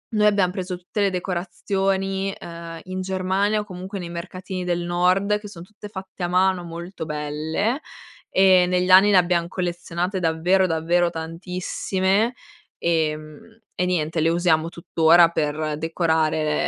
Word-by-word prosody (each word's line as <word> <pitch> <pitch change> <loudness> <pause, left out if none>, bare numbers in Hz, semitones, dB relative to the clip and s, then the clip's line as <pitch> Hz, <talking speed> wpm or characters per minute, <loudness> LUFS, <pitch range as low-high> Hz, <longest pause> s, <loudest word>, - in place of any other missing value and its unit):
noi 210 0 +3
abbiam 200 -3 +3
preso 185 -1 -4
tutte 180 +4 -4
le 200 - +3
decorazioni, 195 +1 -1
ehm, 170 -2 -9
in 185 0 -4
Germania 190 +3 0
o 210 - -4
comunque 190 0 -7
nei 175 - -6
mercatini 185 +2 -6
del 175 -1 -1
nord 180 +4 +2
che 210 - -10
son 180 -5 -11
tutte 210 +2 -12
fatte 190 -2 -8
a - - +1
mano, 185 0 +2
molto 170 +1 -7
belle 155 - -2 0.5
e 185 -1 +5
negli 180 0 +1
anni 190 +3 +7
ne 195 - +6
abbiam 175 -1 +2
collezionate 175 +1 -3
davvero, 175 +3 +2
davvero 170 +1 +1
tantissime 185 +5 -1 0.5
e 160 -2 +1
mhmm, 155 +9 -13 0.2
e 180 - +1
niente 160 -3 0
le 160 - +3
usiamo 165 -1 +2
tuttora 170 0 +4
per 155 -1 -2
decorare 160 -1 0
180 Hz, 150 wpm, -23 LUFS, 165-190 Hz, 0.5 s, anni